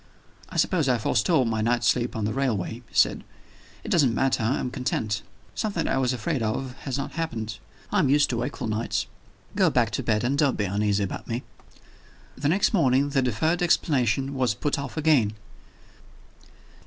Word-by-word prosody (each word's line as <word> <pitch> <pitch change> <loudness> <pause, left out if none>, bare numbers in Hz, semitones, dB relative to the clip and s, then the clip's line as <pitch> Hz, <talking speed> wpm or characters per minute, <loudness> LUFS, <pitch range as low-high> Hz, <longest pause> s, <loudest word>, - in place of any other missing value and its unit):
"I - - -6
suppose 160 -7 +2
I 125 - +3
forestalled 115 +3 +2
my 110 -1 -1
night's 120 +2 +1
sleep 120 0 +1
on 110 -2 -1
the 105 - -1
railway," 120 -8 -1 0.2
he - - -19
said. - - +3 0.6
"It - - -7
doesn't 135 -9 +3
matter; 135 -2 +1
I 115 +5 +1
am 125 - -3
content. 110 -5 -2 0.3
Something 200 -7 -2
that - - 0
I 135 - +1
was 130 -1 +1
afraid 130 +3 -2
of 125 +4 -2
has 135 -2 -2
not 140 - -4
happened. 110 -11 -4 0.3
I 205 - +2
am 145 -8 +3
used 145 +1 +4
to 120 - -1
wakeful 120 +2 -3
nights. 110 +1 -1 0.5
Go - - +4
back - - +1
to - - -2
bed, 105 0 0
and 135 +4 0
don't 140 -3 +2
be 105 - 0
uneasy 100 +1 0
about 100 - -5
me." 120 +2 -3 0.9
The 145 +1 -1
next 190 +7 +2
morning 140 -6 +3
the 140 -1 +1
deferred 145 +9 0
explanation 135 -6 +1
was 125 -5 0
put 145 +5 -1
off 140 +1 -6
again. 145 -9 +3
125 Hz, 190 wpm, -25 LUFS, 110-145 Hz, 0.9 s, used